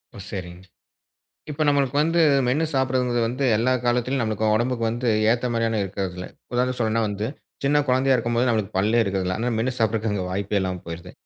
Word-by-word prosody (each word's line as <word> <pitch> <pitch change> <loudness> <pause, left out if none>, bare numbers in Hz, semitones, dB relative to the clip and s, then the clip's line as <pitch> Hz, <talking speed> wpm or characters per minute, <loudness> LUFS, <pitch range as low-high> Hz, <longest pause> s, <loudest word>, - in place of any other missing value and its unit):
ஓ, - - -10
சரிங். 90 -2 -7 0.9
இப்ப 150 +1 -2
நம்மளுக்கு 140 -2 +2
வந்து 165 +2 +2 0.3
மென்னு 150 +6 +1
சாப்பிடுறது 125 -2 +1
வந்து 130 +4 -2
எல்லா 125 +4 +2
காலத்திலும் 125 +2 +1
நம்மளுக்கு 110 -1 -1
உடம்புக்கு 120 0 -1
வந்து 120 +2 -2 0.2
ஏத்த 120 +1 +1
மாதிரியான 115 -1 0
இருக்குறதுல்ல. 95 -2 -4 0.3
உதாரணத்துக்குச் 125 0 0
சொல்றதுன்னா 115 0 +1
வந்து, 105 +1 -3 0.4
சின்னக் 145 0 +2
குழந்தையா 130 +1 +3
இருக்கும்போது 120 +1 0
நம்மளுக்குப் 110 -5 -1
பல்லே 110 +4 +3
இருக்குறதுல்ல, 95 -2 -1
அதுனால, 120 +2 -1
மென்னு 125 +3 0
சாப்பிடுறதுக்கு 110 -1 0
அங்க 95 -3 -2
வாய்ப்பே 100 +2 -1
இல்லாம 95 -1 -3
போயிடுது. 85 +2 -8
115 Hz, 170 wpm, -23 LUFS, 100-125 Hz, 0.9 s, குழந்தையா